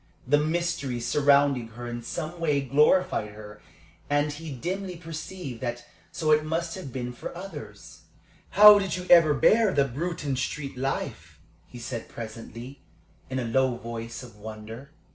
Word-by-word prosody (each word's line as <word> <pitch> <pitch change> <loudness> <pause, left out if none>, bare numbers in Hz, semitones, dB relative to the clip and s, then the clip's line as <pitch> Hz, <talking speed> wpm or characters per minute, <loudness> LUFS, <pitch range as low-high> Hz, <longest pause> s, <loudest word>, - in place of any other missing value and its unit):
The 145 +3 +4
mystery 155 -5 -1
surrounding 140 -1 +3
her 120 0 -6
in 120 0 -5
some 170 +7 -5
way 150 -4 +2
glorified 140 - +2
her, 105 0 -11 0.5
and 145 +1 +2
he 155 +1 -7
dimly 180 +8 -4
perceived 165 -5 -7
that 120 -1 -4 0.3
so 155 -1 0
it 155 0 +5
must 165 +2 -2
have 165 -9 -7
been 125 -1 -4
for 145 - -8
others. 165 - -10 0.5
"How 210 +1 +9
did 190 -3 -2
you 180 - -6
ever 165 -4 +7
bear 215 +9 +4
the 140 -4 +3
Bruton 145 +1 -3
Street 140 +1 -3
life?" 135 +2 -4 0.3
he - - -12
said, 120 -1 -6
presently, 115 +3 -9 0.5
in 130 - -3
a 125 - -1
low 130 +2 +2
voice 115 0 -7
of 120 -4 -13
wonder. 110 +5 -9
140 Hz, 155 wpm, -27 LUFS, 120-165 Hz, 0.5 s, How